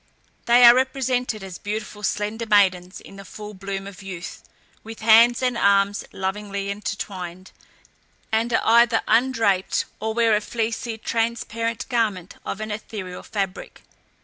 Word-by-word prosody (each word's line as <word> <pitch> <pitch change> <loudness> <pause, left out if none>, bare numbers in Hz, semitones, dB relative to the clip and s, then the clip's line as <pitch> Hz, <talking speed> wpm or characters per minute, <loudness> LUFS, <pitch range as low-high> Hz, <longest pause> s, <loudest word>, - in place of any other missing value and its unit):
They 240 +1 +6
are 235 - +10
represented 255 -4 -1
as 190 -2 -8
beautiful, 210 0 -5
slender 210 +3 -2
maidens 185 -3 +2
in 195 - -14
the 195 - -9
full 210 +3 -9
bloom 195 0 -5
of 200 0 -10
youth, 185 -3 -8 0.4
with 225 0 -10
hands 230 +3 +6
and 250 -1 +1
arms 200 -2 +2
lovingly 200 +1 -3
intertwined, 190 -3 -6 0.8
and 225 +2 +1
are - - +2
either 235 0 +5
undraped, 225 -6 +2
or 220 0 -3
wear 230 -2 +3
a 210 - 0
fleecy, 225 +1 -3
transparent 230 0 -2
garment 215 -8 -1
of 195 - -5
an 215 0 -4
ethereal 205 -3 -6
fabric. 195 -3 -5
210 Hz, 140 wpm, -23 LUFS, 195-230 Hz, 0.8 s, are